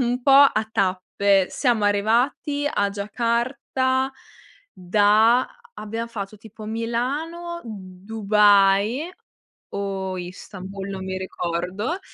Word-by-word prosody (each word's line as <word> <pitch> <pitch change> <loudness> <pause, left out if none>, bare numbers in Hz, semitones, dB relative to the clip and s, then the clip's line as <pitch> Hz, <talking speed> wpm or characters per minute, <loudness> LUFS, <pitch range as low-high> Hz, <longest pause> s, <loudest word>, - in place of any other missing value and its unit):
un - - +3
un 245 +1 -1
po' 275 - +4 0.2
a 220 0 -1
tappe, 195 0 +1
siamo 235 -6 +1
arrivati 245 +8 +1
a 200 -6 0
Giacarta 250 +5 -1 0.6
da 210 +6 +3 0.3
abbiam 225 +2 -5
fatto 210 -2 -6
tipo 215 +1 -12
Milano, 280 +10 -3
Dubai 205 - +2 0.7
o 190 -2 -3
Istanbul 190 +2 -8
non 190 -1 -5
mi 190 0 -4
ricordo, 190 - -3
215 Hz, 100 wpm, -23 LUFS, 195-240 Hz, 0.7 s, po